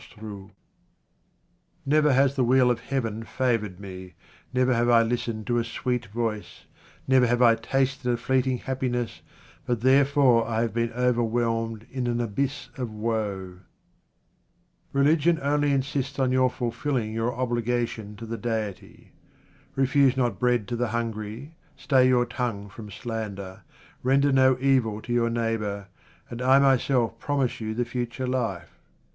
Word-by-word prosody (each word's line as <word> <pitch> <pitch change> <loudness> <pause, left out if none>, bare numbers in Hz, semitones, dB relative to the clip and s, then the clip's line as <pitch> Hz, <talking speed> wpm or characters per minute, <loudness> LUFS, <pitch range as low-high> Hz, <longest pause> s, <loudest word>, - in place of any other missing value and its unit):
QUATRAINS - - -17
OF 105 - -13
OMAR - - -7
KHAYYAM 100 - -24 1.3
Never 150 0 +3
has 135 +1 +3
the 130 - +2
wheel 125 0 +4
of 120 - -1
Heaven 115 -4 -3
favoured 115 -6 -1
me, 95 -3 -9 0.4
never 130 0 +2
have 120 0 +2
I 115 -1 +6
listened 115 -2 -2
to 120 -1 +1
a - - 0
sweet 120 0 -3
voice, 110 0 -4 0.4
never 130 -2 +4
have 120 +1 +2
I 115 -1 +7
tasted 135 +3 -1
a 120 - 0
fleeting 130 +1 +1
happiness, 125 -3 -3 0.4
but 120 -2 -2
therefor 135 -2 +4
I 115 -1 0
have 115 -3 -2
been 115 0 0
overwhelmed 115 -2 0
in 130 -2 -2
an 120 0 0
abyss 135 +5 -2
of 125 -3 -3
woe. 105 -4 -3 1.3
Religion 155 +4 +3
only 145 +1 +1
insists 140 0 -1
on 130 -2 +1
your 130 0 +3
fulfilling 120 -2 -2
your 115 +2 -1
obligation 120 -3 -2
to 115 - -8
the 115 +1 -5
Deity. 110 -5 -5 0.6
Refuse 135 0 +3
not 120 -7 0
bread 120 -3 +1
to 120 - -2
the 120 +1 0
hungry, 115 +4 -4 0.2
stay 130 -2 +3
your 125 -1 +3
tongue 120 -5 -4
from 105 +2 -10
slander, 100 -4 -6 0.4
render 140 +2 +3
no 130 -1 +4
evil 130 -6 +2
to 120 - -3
your 120 -1 +2
neighbour, 110 -4 -2 0.4
and 120 +1 -7
I 130 +2 +5
myself 130 -4 +2
promise 140 -5 -1
you 110 0 -3
the 120 +1 0
future 120 +1 -4
life. 115 -10 -3
120 Hz, 150 wpm, -26 LUFS, 115-130 Hz, 1.3 s, I